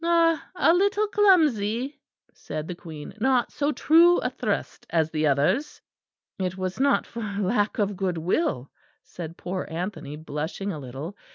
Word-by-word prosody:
"Ah, 335 Hz, -1 st, +3 dB
a 335 Hz, -, +4 dB
little 400 Hz, +3 st, +2 dB
clumsy!" 290 Hz, -, +2 dB, 0.3 s
said 155 Hz, 0 st, -6 dB
the 180 Hz, -, -4 dB
Queen; 160 Hz, -4 st, -9 dB
"not 255 Hz, +1 st, +2 dB
so 290 Hz, +1 st, 0 dB
true 335 Hz, +4 st, +5 dB
a -, -, -1 dB
thrust -, -, -3 dB
as 160 Hz, -2 st, +1 dB
the 155 Hz, -1 st, +1 dB
others." 145 Hz, -, +1 dB, 0.6 s
"It 185 Hz, 0 st, -2 dB
was 185 Hz, +2 st, -3 dB
not 280 Hz, +1 st, +3 dB
for 235 Hz, -, -7 dB
lack 205 Hz, 0 st, 0 dB
of 205 Hz, -1 st, 0 dB
good 185 Hz, -3 st, -1 dB
will," 160 Hz, -, -1 dB, 0.3 s
said 170 Hz, -1 st, -8 dB
poor 185 Hz, +1 st, -4 dB
Anthony 165 Hz, -3 st, -5 dB
blushing 155 Hz, +6 st, -4 dB
a 155 Hz, -, -5 dB
little. 140 Hz, +8 st, -7 dB
200 Hz, 155 wpm, -25 LUFS, -, 0.6 s, true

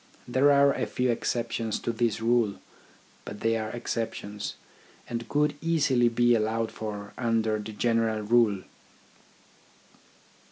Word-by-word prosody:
There 130 Hz, +4 st, +4 dB
are 140 Hz, 0 st, +5 dB
a -, -, -2 dB
few 125 Hz, -1 st, 0 dB
exceptions 115 Hz, -1 st, -2 dB
to -, -, -1 dB
this 115 Hz, -1 st, -1 dB
rule, 115 Hz, -3 st, +2 dB, 0.7 s
but 105 Hz, -, -8 dB
they 115 Hz, 0 st, +2 dB
are 110 Hz, -1 st, -2 dB
exceptions, 110 Hz, -3 st, -4 dB, 0.5 s
and 115 Hz, -1 st, -5 dB
could 150 Hz, 0 st, +2 dB
easily 140 Hz, -7 st, +3 dB
be 120 Hz, +1 st, +3 dB
allowed 110 Hz, 0 st, 0 dB
for 105 Hz, -2 st, -6 dB
under 115 Hz, -2 st, +1 dB
the 105 Hz, +1 st, -6 dB
general 115 Hz, 0 st, +1 dB
rule. 105 Hz, -3 st, +3 dB
115 Hz, 125 wpm, -27 LUFS, 110-120 Hz, 0.7 s, are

